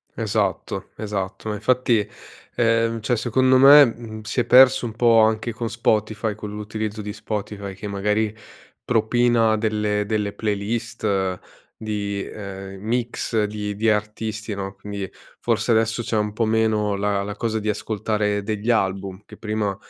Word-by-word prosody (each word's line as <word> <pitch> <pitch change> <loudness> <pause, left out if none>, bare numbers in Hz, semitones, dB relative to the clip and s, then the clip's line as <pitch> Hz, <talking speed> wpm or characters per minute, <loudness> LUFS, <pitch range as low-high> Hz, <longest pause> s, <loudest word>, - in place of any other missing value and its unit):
Esatto, - - -2
esatto. 105 0 -4
Ma, 105 - -2
infatti, 115 -1 +1 0.5
ehm, 115 -1 +2
cioè 120 +3 +1
secondo 130 +3 +3
me, 140 +2 +9
mhmm, 115 -2 -6
si 115 +3 -1
è - - -2
perso 130 0 +6
un 115 - -3
po' 115 -2 +5
anche 110 +1 +1
con 115 0 -4
Spotify, 110 -1 0
con 105 -1 -7
l'utilizzo 105 0 -4
di 105 0 -5
Spotify, 105 -2 -5
che 100 +2 -7
magari 105 +2 0 0.5
propina 115 -1 +3
delle 105 -1 0
delle 105 -1 -1
playlist 105 -3 -2 0.4
di 100 -2 -3
ehm, 95 -2 -8
mix 115 -1 -1
di 105 -1 -4
di 110 +2 +1
artisti, 105 +1 -2
no, 95 0 -5
quindi 100 -1 -6 0.3
forse 115 0 0
adesso 110 +1 +2
c'è 110 - -1
un 105 0 0
po' 115 +1 0
meno 110 -2 +1
la 100 0 0
la 105 +1 -5
cosa 110 0 -1
di 105 0 -2
ascoltare 105 -1 -1
degli 110 +2 -3
album 95 -2 0
che - - -13
prima 105 -3 -2
110 Hz, 150 wpm, -22 LUFS, 105-115 Hz, 0.5 s, me